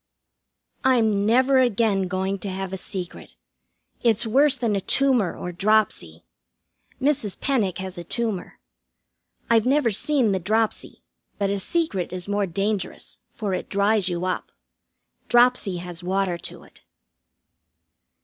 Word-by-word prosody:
I'm 220 -6 +3
never 260 +4 +4
again 220 -5 +2
going 190 +1 -2
to 200 - -5
have 190 0 -4
a - - -1
secret. 180 -1 -7 0.7
It's 230 -1 +2
worse 270 +6 +3
than 225 -4 0
a 195 - -1
tumor 250 -4 +2
or 180 - -5
dropsy. 215 +5 0 0.8
Mrs. 265 -7 0
Penick 225 -10 0
has 190 -1 -6
a - - -6
tumor. 220 0 -3 0.9
I've 230 0 +3
never 275 -3 +3
seen 255 +1 +1
the 190 - 0
dropsy, 215 +4 -1 0.3
but 200 -1 0
a 200 - -1
secret 205 - -1
is 180 0 -5
more 205 -1 0
dangerous, 195 +2 -3
for 205 -4 -4
it 185 - -4
dries 200 -1 +2
you 175 0 -2
up. 185 - -3 0.8
Dropsy 240 -6 +3
has 175 0 -8
water 185 -1 -1
to - - -8
it. - - -18
205 Hz, 135 wpm, -24 LUFS, 190-235 Hz, 0.9 s, never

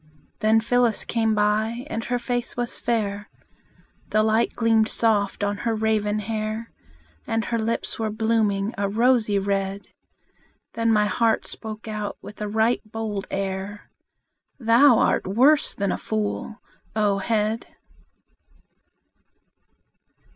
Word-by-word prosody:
Then 220 +1 +4
Phyllis 240 0 +2
came 225 -2 +1
by, 215 +4 0
and 230 -7 -4
her 245 - 0
face 245 0 -3
was 240 -1 -2
fair, 210 -3 -2 0.8
The 215 0 +3
light 220 +1 +1
gleamed 225 -1 +3
soft 205 -3 +1
on 205 0 0
her 230 +1 -1
raven 215 -1 0
hair; 215 +1 -3 0.6
And 225 -1 0
her 230 - -1
lips 230 +1 -2
were 220 -1 0
blooming 215 -1 0
a 200 -1 0
rosy 225 -1 +3
red. 195 0 -2 0.8
Then 230 0 +1
my 210 -1 +4
heart 225 +3 +1
spoke 220 0 -7
out 210 -1 -4
with 210 - -11
a 210 - -2
right 220 +3 +1
bold 215 -2 -5
air: 195 +1 -4 0.7
"Thou 235 +2 +6
art - - +2
worse 265 +10 +3
than 200 -2 -1
a - - -2
fool, 215 0 -3 0.4
O 205 -2 +2
head!" 220 +1 -1
220 Hz, 125 wpm, -24 LUFS, 205-230 Hz, 0.8 s, Thou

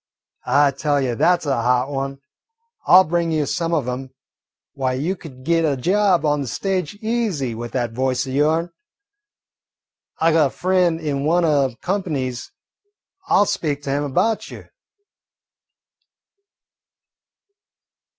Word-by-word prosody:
I 145 0 +4
tell 145 +1 0
you, 130 -3 -1
that 175 +9 +2
's - - -8
a 135 -5 0
hot 125 +3 +1
one. 135 0 -4 0.7
I 180 - +8
'll 190 - +8
bring 170 0 -1
you 155 -2 +1
some 165 +3 -2
of 150 -7 0
'em. 130 +1 -4 0.6
Why, 130 -2 -1
you 155 +9 -1
could 135 -8 -13
git 165 +3 +2
a 145 -4 +1
job 185 +3 +2
on 145 -1 +1
the 135 - -4
stage 185 - -2
easy 215 - -1
with 120 +1 -7
that 120 -3 -1
voice 130 +2 -1
o' 130 - -6
yourn. 155 +5 +1 1.5
I 165 +1 +3
got 155 -2 +4
a - - -5
frien' 180 0 +1
in 145 -3 -2
one 170 +3 +2
o' 145 -4 +3
the 120 - -12
comp'nies 150 -11 -2 0.8
an' - - +3
I - - +6
'll - - +4
speak 145 -6 -2
to 140 - -3
him 145 +1 0
about 210 +11 0
you." - - -11
145 Hz, 155 wpm, -21 LUFS, 135-170 Hz, 1.5 s, I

